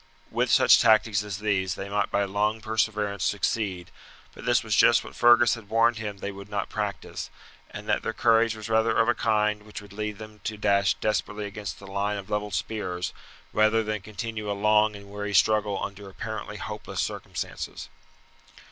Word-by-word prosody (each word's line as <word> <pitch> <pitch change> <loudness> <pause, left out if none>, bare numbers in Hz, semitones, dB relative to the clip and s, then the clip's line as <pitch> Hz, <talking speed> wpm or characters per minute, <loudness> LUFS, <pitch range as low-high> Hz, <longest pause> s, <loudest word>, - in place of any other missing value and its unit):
With - - +1
such - - +6
tactics 110 -1 +4
as 105 -2 -5
these 95 -3 0
they 95 - -6
might 100 +1 0
by 100 - +1
long 105 +3 0
perseverance 105 -2 -1
succeed; 100 -3 -1 0.4
but - - -11
this - - +3
was - - 0
just - - +5
what - - -11
Fergus 120 0 +6
had 115 -4 -8
warned 115 +1 +3
him 105 -2 -5
they 100 +1 -4
would 100 +1 -10
not 100 -1 -2
practise, - - -4 0.4
and - - -9
that - - +1
their - - -2
courage 115 -1 +3
was 110 0 -7
rather 110 0 +2
of 115 - +4
a 120 - +4
kind 105 -2 +1
which 105 0 -9
would 100 -2 -13
lead 105 0 -4
them 110 -1 -11
to 110 - -3
dash 100 -2 +2
desperately 105 -1 -2
against 100 0 -6
the 100 - -12
line 100 +1 -1
of 100 +1 -8
levelled 105 -2 -1
spears, 90 -5 -3 0.4
rather 110 +1 +3
than 110 -1 -3
continue 110 +1 -5
a - - +1
long 105 +1 +3
and 100 0 -12
weary 105 0 -3
struggle 105 -2 +3
under 100 0 -6
apparently 95 - -6
hopeless - - -6
circumstances. - - -4
105 Hz, 185 wpm, -26 LUFS, 100-110 Hz, 0.4 s, such